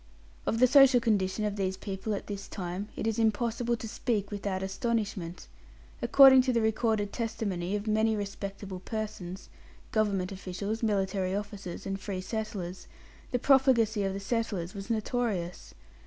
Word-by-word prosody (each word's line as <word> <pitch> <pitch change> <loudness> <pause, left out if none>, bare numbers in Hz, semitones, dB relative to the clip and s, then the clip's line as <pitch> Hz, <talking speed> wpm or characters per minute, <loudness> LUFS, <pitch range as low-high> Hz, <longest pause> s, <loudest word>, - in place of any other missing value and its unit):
Of 225 - +1
the 255 - +6
social 265 -1 +7
condition 210 -2 +1
of 210 0 -2
these 190 -1 -1
people 195 +2 -3
at - - -6
this 200 -1 -6
time 185 +2 -5
it - - -3
is 225 0 0
impossible 235 +2 +1
to 225 - -6
speak 215 -2 -2
without 200 -2 -2
astonishment. 195 -4 -2 0.6
According 265 -2 +8
to 255 0 +1
the 235 - +2
recorded 220 -2 +1
testimony 205 -5 -2
of 205 0 -3
many 220 0 +2
respectable 200 -2 -5
persons 200 -3 -5 0.4
Government 200 -4 +1
officials, 195 +3 -4
military 195 -3 0
officers, 200 -3 -5
and 195 0 -3
free 195 -1 -4
settlers 190 -2 -5 0.4
the 250 - +1
profligacy 245 -5 +4
of 195 -1 0
the - - -3
settlers 200 -5 -2
was 195 -1 -7
notorious. 215 -6 -2
205 Hz, 150 wpm, -29 LUFS, 190-225 Hz, 0.6 s, According